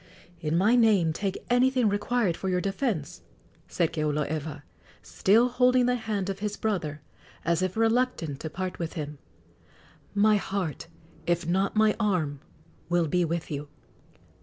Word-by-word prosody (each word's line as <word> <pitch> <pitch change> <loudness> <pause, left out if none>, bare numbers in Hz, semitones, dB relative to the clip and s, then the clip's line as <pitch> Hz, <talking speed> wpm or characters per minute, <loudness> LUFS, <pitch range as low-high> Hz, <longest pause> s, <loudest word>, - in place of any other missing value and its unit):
"In 160 0 0
my 210 +7 +4
name 205 -9 +4
take 195 +3 -3
anything 250 0 +3
required 205 -2 +1
for 190 - -3
your 180 -1 +1
defence," 195 - -2 0.5
said 170 -3 0
Keoloewa, 150 -1 -2 0.4
still 225 +5 +3
holding 250 0 +3
the 250 - +2
hand 215 -5 -2
of 195 -1 -3
his 210 0 -3
brother, 165 -9 -2 0.4
as 170 0 +2
if 185 +2 -1
reluctant 225 - +1
to 160 - -5
part 185 +3 -5
with 165 -2 -3
him; 150 -2 -6 1.0
"my 210 +1 +5
heart, 190 -6 -3 0.4
if 175 0 +1
not 190 +5 0
my 215 0 +4
arm, 170 -10 0 0.5
will 175 -1 +2
be 180 +4 +2
with 170 0 -3
you!" 145 0 -4
185 Hz, 145 wpm, -27 LUFS, 160-220 Hz, 1.0 s, my